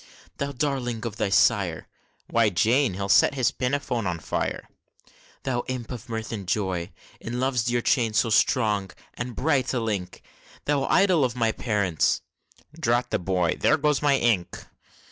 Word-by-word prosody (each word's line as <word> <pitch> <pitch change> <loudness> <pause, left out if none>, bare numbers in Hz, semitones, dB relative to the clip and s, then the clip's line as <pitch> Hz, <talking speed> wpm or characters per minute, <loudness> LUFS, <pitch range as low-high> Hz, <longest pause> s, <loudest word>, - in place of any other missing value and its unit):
Thou 140 0 -2
darling 125 -4 -2
of 115 - -5
thy 100 - 0
sire! 95 - +2 0.4
(Why, 115 -2 +3
Jane, 115 +4 +2
he'll 100 +1 -3
set 100 - +5
his 130 -3 +2
pinafore 125 -2 -2
a 85 -2 -2
fire!) - - -3 0.8
Thou 120 -3 -1
imp 130 -3 -5
of 120 -2 -8
mirth 110 -1 -4
and 100 -5 -5
joy! 95 -3 -1 0.3
In 120 +2 -5
Love's 130 -3 0
dear 120 -1 0
chain 115 -5 +2
so 110 +2 +2
strong 105 -4 +2 0.2
and 120 -1 -5
bright 135 -4 +1
a - - +1
link, 105 -6 -4 0.4
Thou 140 -2 +1
idol 185 -6 +3
of 125 -2 0
thy 115 -2 +1
parents 100 -8 0 0.6
(Drat 120 -4 +1
the - - +1
boy! 90 -1 0
There - - +3
goes 150 -1 +1
my 145 -2 +3
ink!) 110 -9 0
120 Hz, 165 wpm, -25 LUFS, 105-130 Hz, 0.8 s, set